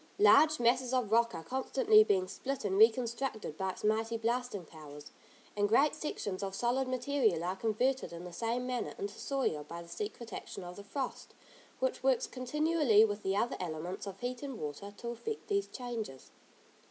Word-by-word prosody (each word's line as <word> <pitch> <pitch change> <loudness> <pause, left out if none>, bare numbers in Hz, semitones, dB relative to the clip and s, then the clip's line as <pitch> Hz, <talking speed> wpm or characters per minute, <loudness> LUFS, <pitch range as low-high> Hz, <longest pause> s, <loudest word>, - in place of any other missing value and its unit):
Large 310 -6 +6
masses 245 +2 +2
of 240 -5 0
rock 230 -3 +3
are 165 - -6
constantly 430 - +4
being 185 - +1
split 270 +5 -4
and 190 -1 0
reconstructed 230 - +2
by 190 +3 -2
its 185 - -7
mighty 225 +2 +1
blasting 235 -4 -2
powers, 150 -2 -11 0.4
and 205 0 +2
great 280 +7 +4
sections 200 -10 -4
of 195 -1 -3
solid 245 +4 +1
material 250 - +1
are 180 +2 -1
converted 235 +5 0
in 170 0 -8
the 180 - -8
same 235 +5 -1
manner 250 -1 -3
into 200 0 -4
soil 260 - -1
by 170 +3 -8
the - - -15
secret 210 +5 -6
action - - -7
of 180 0 -8
the 200 - -8
frost, 260 +5 -5 0.4
which - - 0
works - - +3
continually 265 -3 +3
with 205 -1 -3
the 190 0 0
other 230 +3 0
elements 175 +3 -4
of 195 -1 -7
heat 250 0 -3
and 275 -5 -6
water 150 +7 -5
to 235 - -5
effect 425 - -5
these 400 -1 +1
changes. 230 - -6
230 Hz, 180 wpm, -33 LUFS, 190-260 Hz, 0.4 s, Large